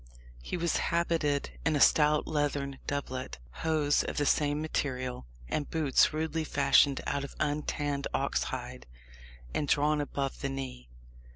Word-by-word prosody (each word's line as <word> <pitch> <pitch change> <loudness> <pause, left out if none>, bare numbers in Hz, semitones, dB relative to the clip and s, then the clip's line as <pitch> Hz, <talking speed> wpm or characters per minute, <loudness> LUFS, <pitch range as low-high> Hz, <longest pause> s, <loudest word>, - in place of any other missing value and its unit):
He 120 - -4
was 170 -1 +1
habited 165 -4 0
in 160 - +2
a - - +1
stout 150 +1 +5
leathern 145 -2 -1
doublet, 130 - -3 0.2
hose 150 -2 +2
of - - -5
the 145 - +2
same 145 0 +2
material, 130 - -3 0.2
and 145 - -2
boots 155 -5 +3
rudely 160 +1 -1
fashioned 140 -2 +4
out 140 - -1
of 140 - -8
untanned 145 -1 -1
ox 140 - 0
hide, 125 - -6 0.7
and 145 - -1
drawn 150 +1 +2
above 140 -1 -3
the 140 - -1
knee. 130 - -6
145 Hz, 145 wpm, -30 LUFS, 135-150 Hz, 0.7 s, stout